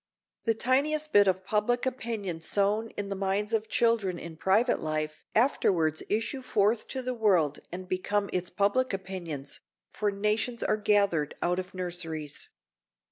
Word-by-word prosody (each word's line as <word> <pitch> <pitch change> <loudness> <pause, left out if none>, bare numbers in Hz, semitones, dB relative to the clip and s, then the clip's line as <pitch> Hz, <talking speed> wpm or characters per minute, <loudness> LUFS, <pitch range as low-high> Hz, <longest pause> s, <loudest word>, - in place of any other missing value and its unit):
The 225 -1 +2
tiniest 295 +6 +1
bit 205 -1 +7
of 185 0 +1
public 220 +5 +1
opinion 220 -9 -3
sown 205 +5 +1
in 200 -1 -3
the 195 - -2
minds 195 +3 -1
of 220 -1 0
children 225 -6 +2
in 170 -1 -8
private 210 +9 +2
life 155 -1 -3
afterwards 175 - +2
issue 225 +6 -1
forth 215 -2 +1
to 260 -1 -4
the 255 0 -2
world 185 - +2
and 185 +1 -6
become 200 +2 0
its 180 -1 -1
public 205 +6 +1
opinions, 180 -7 -5 0.3
for 210 - 0
nations 210 +4 0
are - - +2
gathered 200 -8 +2
out 180 +1 +1
of 185 0 -7
nurseries. 165 -5 -4
200 Hz, 150 wpm, -29 LUFS, 180-225 Hz, 0.3 s, bit